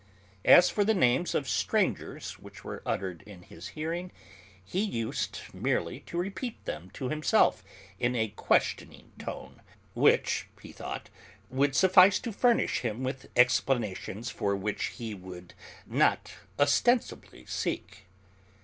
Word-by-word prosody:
As 180 Hz, -, +8 dB
for 205 Hz, -, +1 dB
the 220 Hz, +2 st, +2 dB
names 130 Hz, +1 st, +2 dB
of 140 Hz, -, 0 dB
strangers -, -, -1 dB
which -, -, -13 dB
were -, -, -7 dB
uttered 90 Hz, -4 st, -2 dB
in 95 Hz, -4 st, -12 dB
his 85 Hz, +1 st, -10 dB
hearing, 170 Hz, +4 st, -3 dB, 0.5 s
he 185 Hz, -, -1 dB
used 115 Hz, -, -2 dB
merely -, -, -1 dB
to 170 Hz, -, -5 dB
repeat 200 Hz, +7 st, -4 dB
them 85 Hz, +4 st, -5 dB
to 130 Hz, -, -3 dB
himself 155 Hz, -, +2 dB, 0.4 s
in 125 Hz, +3 st, +1 dB
a 110 Hz, -2 st, 0 dB
questioning 105 Hz, -, -1 dB
tone, -, -, -8 dB, 0.3 s
which, -, -, +2 dB
he -, -, -11 dB
thought, -, -, -7 dB, 0.4 s
would 135 Hz, +1 st, +1 dB
suffice 185 Hz, +4 st, +7 dB
to 235 Hz, -, -4 dB
furnish 240 Hz, +3 st, +2 dB
him 120 Hz, +1 st, -3 dB
with 130 Hz, 0 st, -4 dB
explanations 120 Hz, -3 st, +1 dB
for 100 Hz, -4 st, -1 dB
which 100 Hz, +1 st, -2 dB
he 115 Hz, -3 st, -6 dB
would 90 Hz, -2 st, -10 dB, 0.3 s
not -, -, +1 dB, 0.2 s
ostensibly 145 Hz, -, +1 dB
seek. 95 Hz, -, -4 dB
130 Hz, 130 wpm, -29 LUFS, -, 0.5 s, As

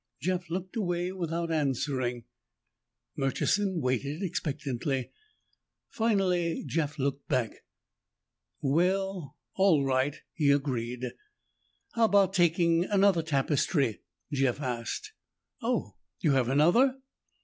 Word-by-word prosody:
Jeff 180 Hz, +2 st, -2 dB
looked 185 Hz, +5 st, -4 dB
away 175 Hz, -4 st, -1 dB
without 170 Hz, -2 st, -3 dB
answering. 135 Hz, -5 st, -1 dB, 0.9 s
Murchison 175 Hz, +7 st, 0 dB
waited 140 Hz, -, -1 dB
expectantly. 140 Hz, -6 st, -2 dB, 0.8 s
Finally 185 Hz, -7 st, +1 dB
Jeff 150 Hz, -2 st, -2 dB
looked 140 Hz, 0 st, -2 dB
back. 125 Hz, -4 st, +1 dB, 1.1 s
"Well, 180 Hz, +1 st, 0 dB, 0.2 s
all 180 Hz, -8 st, +4 dB
right," 135 Hz, +2 st, +1 dB, 0.2 s
he 150 Hz, -3 st, +2 dB
agreed. 125 Hz, -3 st, 0 dB, 0.9 s
"How 230 Hz, -1 st, +3 dB
about 200 Hz, -3 st, +4 dB
taking 170 Hz, -1 st, +3 dB
another 200 Hz, -4 st, +3 dB
tapestry?" 140 Hz, -, 0 dB, 0.3 s
Jeff 135 Hz, -2 st, +1 dB
asked. 130 Hz, -, -4 dB, 0.5 s
"Oh, 225 Hz, -, -2 dB, 0.2 s
you 155 Hz, -, +2 dB
have 130 Hz, -3 st, +2 dB
another?" 175 Hz, -, +4 dB
155 Hz, 95 wpm, -29 LUFS, 135-185 Hz, 1.1 s, all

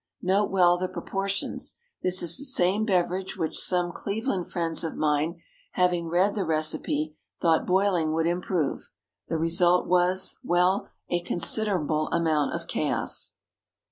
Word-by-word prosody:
Note 195 Hz, +3 st, +2 dB
well 175 Hz, -2 st, +4 dB
the 185 Hz, -, -1 dB
proportions. 195 Hz, +2 st, -3 dB, 0.3 s
This 185 Hz, 0 st, +3 dB
is 170 Hz, -1 st, +3 dB
the -, -, -4 dB
same 215 Hz, -6 st, +2 dB
beverage 185 Hz, -1 st, 0 dB
which 165 Hz, -3 st, -1 dB
some 180 Hz, -1 st, +2 dB
Cleveland 200 Hz, -1 st, -3 dB
friends 165 Hz, -2 st, -2 dB
of 165 Hz, -, -4 dB
mine, 155 Hz, +2 st, 0 dB, 0.3 s
having 175 Hz, -2 st, +1 dB
read 180 Hz, +5 st, +2 dB
the 200 Hz, -, -1 dB
recipe, 155 Hz, -1 st, -1 dB, 0.3 s
thought 165 Hz, -2 st, +2 dB
boiling 180 Hz, -4 st, +2 dB
would 160 Hz, +1 st, 0 dB
improve. 175 Hz, -3 st, -1 dB, 0.4 s
The 165 Hz, -, -1 dB
result 175 Hz, +2 st, +3 dB
was 180 Hz, +1 st, +2 dB
well, 180 Hz, +3 st, +2 dB, 0.2 s
a 175 Hz, 0 st, +1 dB
considerable 175 Hz, -4 st, 0 dB
amount 160 Hz, -3 st, +1 dB
of -, -, -5 dB
chaos. -, -, -2 dB
175 Hz, 140 wpm, -26 LUFS, 165-190 Hz, 0.4 s, well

